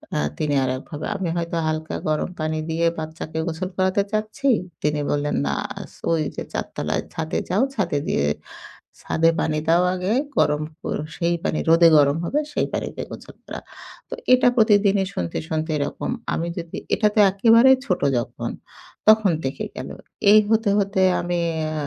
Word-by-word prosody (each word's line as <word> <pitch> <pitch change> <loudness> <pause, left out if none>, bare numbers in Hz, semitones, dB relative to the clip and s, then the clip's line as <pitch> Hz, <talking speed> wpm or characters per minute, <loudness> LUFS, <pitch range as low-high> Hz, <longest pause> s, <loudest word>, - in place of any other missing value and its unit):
আ - - +1 0.2
তিনি 150 -2 -1
আরেকভাবে। 130 +4 -4
আমি 190 -3 -2
হয়তো 170 0 -3
হালকা 155 0 -3
গরম 155 +3 0
পানি 155 0 -1
দিয়ে 165 +1 0
বাচ্চাকে 160 0 -6
গোসল 170 +3 -3
করাতে 190 +1 +2
চাচ্ছি। 215 +6 -2 0.3
তিনি 150 0 0
বললেন, 145 0 0
"না, 70 - 0 0.3
আছ - - -10 0.2
ওইযে 155 -3 -1
৪ - - -2
তালায় - - -1
ছাদে 160 0 -3
যাও। 200 +7 +2
ছাদে 175 -8 0
দিয়ে 70 - +1 0.8
ছাদে 165 +1 +2
পানি 155 -1 0
দাও 170 +2 +4
আগে 185 +1 -2 0.3
গরম 150 0 +2 0.2
কর - - -2 0.2
সেই 170 -1 +1
পানি 155 - 0
রোদে 165 +1 +7
গরম 145 0 +4
হবে 290 - 0
সেই - - 0
পানিতে - - -4
গোসল - - -10
করাও।" - - -7 0.5
তো - - -5 0.2
এটা 255 0 +6
প্রতিদিনই 205 -3 +4
শুনতে, 85 -1 -3
শুনতে 160 0 -2
এরকম। 145 0 -3 0.2
আমি 170 - -2
যদি 165 -1 -6 0.2
এটাতে 210 -1 +1
একেবারে 230 +6 +5 0.2
ছোট 180 - 0 0.2
যখন 120 - -4 0.6
তখন 215 -4 +2
দেখে 135 - -3
গেলো। - - -7 0.4
এই 215 - +8
হতে, 220 -2 +3
হতে 195 -1 0 0.2
আমি 175 0 -2 0.3
আ - - -4
170 Hz, 160 wpm, -22 LUFS, 155-200 Hz, 0.8 s, এই